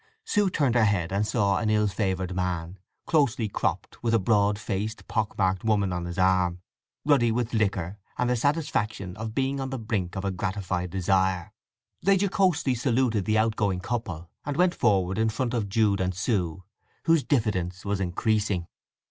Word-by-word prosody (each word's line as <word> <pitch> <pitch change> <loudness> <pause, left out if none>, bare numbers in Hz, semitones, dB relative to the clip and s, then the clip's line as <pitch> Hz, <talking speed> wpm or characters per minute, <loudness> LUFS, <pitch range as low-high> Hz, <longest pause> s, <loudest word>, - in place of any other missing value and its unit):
Sue 205 - +2
turned 140 -8 +1
her 120 -2 +4
head 95 -5 +1
and 100 +2 0
saw 100 -5 +2
an 110 - 0
ill 105 0 +3
favoured 95 -3 -1
man, 90 0 -2 0.3
closely 130 -8 +2
cropped, 95 -2 -3
with 115 -1 +2
a - - +4
broad 105 0 +2
faced, 105 +1 -4
pock 110 -2 -1
marked 95 -1 +1
woman 100 -4 +1
on 90 -1 -3
his 85 -1 -6
arm, 95 -1 +2 0.5
ruddy 135 -6 +4
with 120 +1 -1
liquor 100 -3 0 0.2
and 125 - +1
the 125 - +2
satisfaction 115 - -1
of 110 +1 -6
being 135 0 0
on 135 0 -3
the 135 - -3
brink 105 -6 -2
of 95 +1 -3
a 100 - 0
gratified 95 -1 -2
desire. 95 -1 0 0.5
They 195 0 +4
jocosely 190 -8 +2
saluted 120 -4 +1
the 110 0 +2
outgoing 110 -4 +1
couple, 95 -7 -4 0.2
and 145 0 -3
went 180 0 +4
forward 95 - +1
in 110 0 +3
front 120 +2 -2
of 110 -5 -1
Jude 100 -2 +2
and 90 0 -1
Sue, 95 -4 -1 0.4
whose 165 -2 +4
diffidence 100 - -1
was 100 -1 -1
increasing. 100 0 0
105 Hz, 175 wpm, -26 LUFS, 95-120 Hz, 0.5 s, her